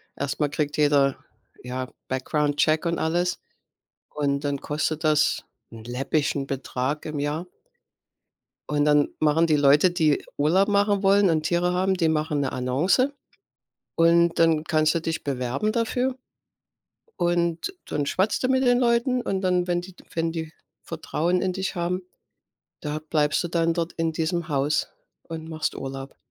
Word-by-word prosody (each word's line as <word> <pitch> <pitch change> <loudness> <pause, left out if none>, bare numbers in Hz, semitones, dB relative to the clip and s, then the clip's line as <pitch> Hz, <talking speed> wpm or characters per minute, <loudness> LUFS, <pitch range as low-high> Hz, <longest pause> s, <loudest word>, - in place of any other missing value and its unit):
erstmal 145 +1 -1
kriegt 145 +1 -2
jeder, 145 -2 +3 0.5
ja, 130 +1 -5 0.2
Background 145 +3 -1
Check 155 +2 +2
und 170 0 0
alles, 175 +3 0 0.8
und 140 -1 0
dann 145 -1 -1
kostet 155 +2 -2
das 155 -1 +2 0.3
'n 115 -1 -10
läppischen 135 +3 -1
Betrag 135 +1 -3
im 155 -2 -4
Jahr. 150 +5 -2 1.2
Und 145 -1 +1
dann 150 -1 +4
machen 155 +2 +3
die 155 - +3
Leute, 145 +5 +5
die 160 -4 +2 0.2
Urlaub 175 +7 +3
machen 205 -1 +2
wollen 200 0 +4
und 155 -2 +1
Tiere 175 +2 +1
haben, 190 +1 +1
die 170 -3 +1
machen 155 -2 0
'ne 135 - -1
Annonce 150 - +1 0.9
und 170 0 +4
dann 165 -2 +4
kannst 155 0 +2
du 170 - 0
dich 165 0 -3
bewerben 135 - -1
dafür. 245 +3 0 1.0
Und 175 - 0
dann 145 - -2
schwatzt 190 - 0
du - - +3
mit 260 0 +2
den 245 0 +4
Leuten. 245 +1 +2
Und 195 -5 -2
dann, 180 -1 +1
wenn 175 0 0
die 180 0 -12 0.2
wenn 165 0 0
die 160 -1 -5 0.3
Vertrauen 170 +2 -1
in 185 - 0
dich 190 +1 -3
haben, 180 +1 -2 0.8
da 150 +1 -3
bleibst 155 0 0
du - - -2
dann 165 0 +1
dort 170 0 -2
in 165 -1 -1
diesem 165 +1 -2
Haus 145 0 0 0.4
und 160 -1 -7
machst 160 -1 -3
Urlaub. 135 0 -7
160 Hz, 155 wpm, -25 LUFS, 145-180 Hz, 1.2 s, Leute